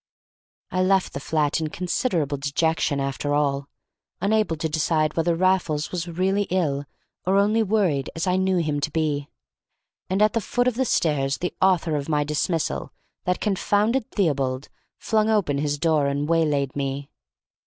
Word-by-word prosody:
I 185 - +1
left 190 0 +2
the - - -4
flat 150 +1 0
in 155 - -1
considerable 170 - -1
dejection 145 +1 0
after 140 +1 -1
all, 140 -1 0 0.5
unable 210 -4 +1
to 160 +1 -2
decide 155 0 0
whether 165 +1 +1
Raffles 175 -4 +1
was 175 -1 -3
really 190 +4 0
ill, 145 -6 0 0.4
or 190 +1 +3
only 210 +3 +3
worried 190 -10 +1
as 165 - -2
I 180 -1 +2
knew 190 0 +2
him 155 -4 0
to 145 - 0
be. 150 -2 -1 0.8
And 190 +3 +2
at 215 - +3
the 230 - +1
foot 245 +4 0
of 250 - +2
the 260 +3 0
stairs 140 - +1
the 180 - -3
author 175 -4 +3
of 140 +1 -5
my 150 -1 +2
dismissal, 150 - -1 0.3
that 180 0 0
confounded 210 +4 +1
Theobald, 140 -8 -1 0.3
flung 220 -1 +1
open 185 -10 +1
his 145 0 -1
door 155 -2 +2
and 140 +1 -1
waylaid 150 -5 +1
me. 140 0 -3
160 Hz, 160 wpm, -24 LUFS, 145-190 Hz, 0.8 s, or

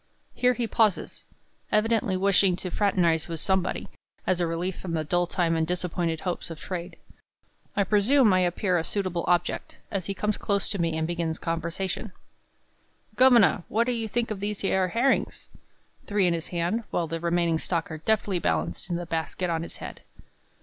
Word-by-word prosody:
Here 250 0 +2
he 240 - -1
pauses, 220 -3 +1 0.5
evidently 215 -3 +2
wishing 195 -1 +4
to 180 0 -5
fraternize 175 -6 +2
with 165 -2 -2
somebody, 190 +1 0 0.4
as 180 -1 +1
a 170 - +2
relief 170 +2 -2
from 175 -3 -5
the 160 -1 0
dull 175 +3 +1
time 170 -2 +1
and 160 0 +1
disappointed 175 -2 -1
hopes 180 -2 -3
of 165 -2 -7
trade. 180 -1 -6 0.8
I 200 - +3
presume 210 +3 +4
I 185 - +4
appear 180 0 +1
a - - -2
suitable 185 -2 -2
object, 175 -1 0
as 190 -4 -2
he 195 - -2
comes 210 +1 -1
close 200 -2 -1
to 200 - -3
me 165 -1 0
and 160 - 0
begins 165 -1 -2
conversation: 170 +5 -3 1.0
"Governor, 245 -7 +6
what 225 +2 +2
do 250 - -1
you 225 -2 -2
think 235 +1 -1
of 205 - -3
these 205 0 -3
yer 190 -1 +2
herrings?" 240 +7 0 0.6
three 205 -2 +2
in 175 - +3
his 165 -1 -3
hand, 180 +7 -1
while 170 - 0
the 165 +1 -4
remaining 170 -1 +1
stock 165 -2 -2
are 155 - -5
deftly 200 0 +1
balanced - - -1
in 175 - 0
the 175 0 -3
basket 165 +2 -2
on 165 -1 0
his 165 - -7
head. - - -8
180 Hz, 185 wpm, -26 LUFS, 170-205 Hz, 1.0 s, Governor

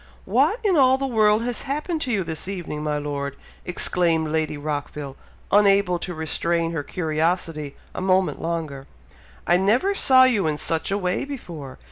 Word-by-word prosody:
"What 460 - +2
in 395 -4 +3
all 260 -1 +5
the 270 - -2
world 215 -3 +3
has 240 -2 -2
happened 305 +4 -3
to 260 - -2
you 200 -4 +1
this 160 0 -5
evening, 175 -6 -5
my 150 -1 -1
Lord?" 140 -1 -4 0.3
exclaimed 170 -3 +1
Lady 155 -1 -1
Rockville, 145 -1 -5 0.4
unable 200 -3 +4
to 180 0 -5
restrain 165 +1 -1
her 165 -3 -2
curiosity 160 -2 -2 0.2
a - - -5
moment 185 0 +1
longer. 160 -5 -4 0.6
"I 175 - +4
never 230 - +2
saw 260 -9 +6
you 220 -9 +3
in 150 -1 -1
such 160 +1 -2
a 200 - 0
way 180 -2 -1
before! 170 - -8
175 Hz, 165 wpm, -23 LUFS, 155-215 Hz, 0.6 s, saw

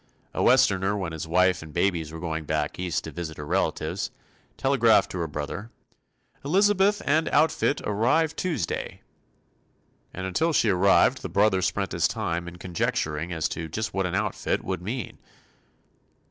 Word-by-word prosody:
A - - -2
Westerner 95 +2 +3
when 95 -4 -3
his 80 0 -5
wife 90 +2 +3
and 80 -1 -10
babies 85 -2 0
were 80 - -7
going 80 -2 -3
back 75 +1 -2
East 90 -2 -1
to 80 - -7
visit 80 -2 -6
her 75 - -6
relatives, - - -1 0.5
telegraphed 125 -5 +3
to 90 - -4
her 85 - -1
brother 75 +9 -5 0.7
"Elizabeth 200 +5 +3
and 160 +3 +2
outfit 150 -1 +2
arrive 120 +10 +1
Tuesday." 160 - -3 1.1
And 95 - -6
until 160 - 0
she 115 - +3
arrived 95 +1 +4
the - - -5
brother 100 +1 +3
spent - - -1
his - - +2
time 85 +1 -3
in 85 - -8
conjecturing 90 -3 -2
as 80 -2 -1
to 80 - -4
just 110 +8 -3
what 95 -1 0
an 90 - -3
"outfit" - - -1
would 95 -2 -3
mean. 115 +6 -5
95 Hz, 160 wpm, -26 LUFS, 80-115 Hz, 1.1 s, arrived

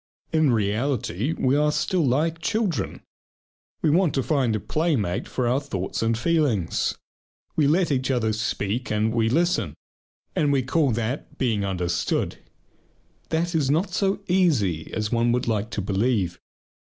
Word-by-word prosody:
In 155 -2 +4
reality, 115 - 0
we 130 +1 +2
are 150 +1 +3
still 180 +3 +1
like 155 +5 +1
children. 175 - -1 0.8
We 155 - +4
want 170 0 +3
to 135 - +1
find 130 -7 +1
a - - -1
playmate 130 - -1
for 125 -2 -1
our 125 +3 +2
thoughts 100 -10 -4
and 115 0 +1
feelings. 135 - +1 0.6
We 150 -3 +3
let 165 +2 +2
each 130 -1 0
other 115 -4 +1
speak 110 +2 -2
and 110 +1 +1
we 115 -1 +2
listen, 160 - +1 0.6
and 145 -2 +2
we 135 -2 +2
call 145 +2 +2
that 115 +5 -3
"being 115 -6 0
understood." 90 -3 -1 0.9
That 170 +2 0
is 150 -5 +1
not 165 +7 +1
so 195 0 0
easy 135 - +1
as 105 -1 -2
one 120 0 +2
would 125 0 -1
like 110 -1 0
to 105 - -3
believe. 100 -3 0
125 Hz, 155 wpm, -24 LUFS, 110-155 Hz, 0.9 s, In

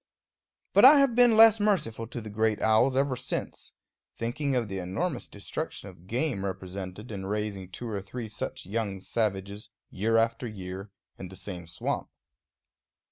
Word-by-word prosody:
But - - +6
I 280 +4 +10
have 275 -3 +4
been 240 -2 +5
less 225 -1 +8
merciful 145 - 0
to 120 0 -6
the 110 -1 -8
great 110 0 +1
owls 110 +4 +3
ever 135 -1 +2
since, - - -5 0.4
thinking 135 +4 -1
of 120 -3 0
the 95 -1 -4
enormous 125 - -2
destruction 100 0 -5
of 90 -1 -16
game 120 -2 -1
represented 95 +3 -6
in 95 -2 -5
raising 100 -2 -3
two 120 +6 -7
or 105 -3 -3
three 110 +4 -6
such 105 -1 -6
young 100 -1 -2
savages, 100 0 -2 0.2
year 115 +4 +1
after 115 +2 +1
year, 95 -1 -7 0.3
in 95 - -6
the 95 - -11
same 90 -4 -7
swamp. 85 - -3
110 Hz, 160 wpm, -28 LUFS, 95-125 Hz, 0.4 s, I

